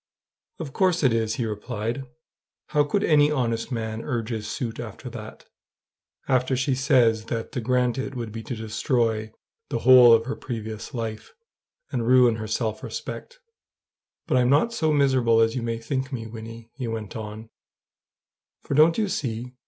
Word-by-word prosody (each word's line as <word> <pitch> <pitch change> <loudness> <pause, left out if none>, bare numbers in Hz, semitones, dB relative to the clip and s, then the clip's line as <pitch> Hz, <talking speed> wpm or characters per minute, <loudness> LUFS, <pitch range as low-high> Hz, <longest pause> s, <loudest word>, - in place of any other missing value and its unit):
"Of 145 -5 -6
course 180 -4 +2
it 130 -4 +4
is," 110 -1 0
he 120 - -2
replied. 115 +4 -4 0.6
"How 150 - +3
could 195 +8 0
any 150 -2 +5
honest 120 -5 -1
man 110 -2 -3
urge 120 -5 -3
his 110 -3 -4
suit 115 0 -4
after - - -7
that, - - -9 0.8
after 130 0 +2
she 130 +2 +1
says 120 -4 +3
that 115 0 -4
to 125 - -3
grant 125 +1 +1
it 135 +1 -4
would 115 -3 -5
be 115 +1 -6
to 125 - -4
destroy 110 0 -1 0.4
the - - -1
whole 125 0 +8
of 115 0 +5
her 130 - -3
previous 110 0 -6
life, 110 -2 -5 0.6
and 115 -1 -1
ruin 125 -2 +5
her 110 -1 -5
self 110 0 -2
respect? - - -7 0.9
But - - +1
I'm 125 -1 +3
not 150 - +3
so 160 -8 +1
miserable 130 -6 +3
as 115 0 +3
you 125 - -1
may 115 0 -2
think 130 +4 -3
me, 120 -4 -4
Wynnie," 115 +1 -9
he 130 -4 -5
went 110 -2 -5
on; 110 +1 -7 1.1
"for - - -3
don't 155 +3 +5
you 215 -2 +1
see? 125 - -3
120 Hz, 170 wpm, -25 LUFS, 115-130 Hz, 1.1 s, whole